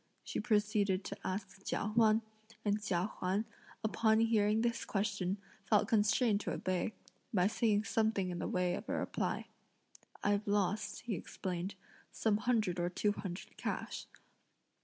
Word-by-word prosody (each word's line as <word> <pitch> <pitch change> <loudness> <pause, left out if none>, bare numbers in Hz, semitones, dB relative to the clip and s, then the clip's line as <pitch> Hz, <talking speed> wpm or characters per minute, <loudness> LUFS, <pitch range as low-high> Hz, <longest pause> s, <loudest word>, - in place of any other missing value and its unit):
she - - -3
proceeded 210 -3 +2
to - - -5
ask 195 +1 -4
Chia 205 - -1
Huan; 220 -1 +5 0.4
and 205 0 +2
Chia 180 -3 +1
Huan, 190 +4 +1 0.4
upon 220 0 +3
hearing 220 -1 +3
this 235 0 0
question, 195 -2 -1 0.3
felt 210 -1 +4
constrained 215 0 +3
to - - -2
obey, 185 +3 -1 0.4
by 185 -4 +3
saying 210 0 +2
something 215 -3 +1
in 175 - -4
the - - -2
way 180 -1 +1
of - - -5
a - - 0
reply. - - -1 0.8
"I've 205 +1 +2
lost," 205 +1 0
he 240 - -3
explained, 185 +1 -4 0.4
"some 215 -2 +2
hundred 215 -7 +1
or 175 0 +1
two 205 +3 +1
hundred 190 -3 -6
cash." - - -3
205 Hz, 145 wpm, -35 LUFS, 190-220 Hz, 0.8 s, Huan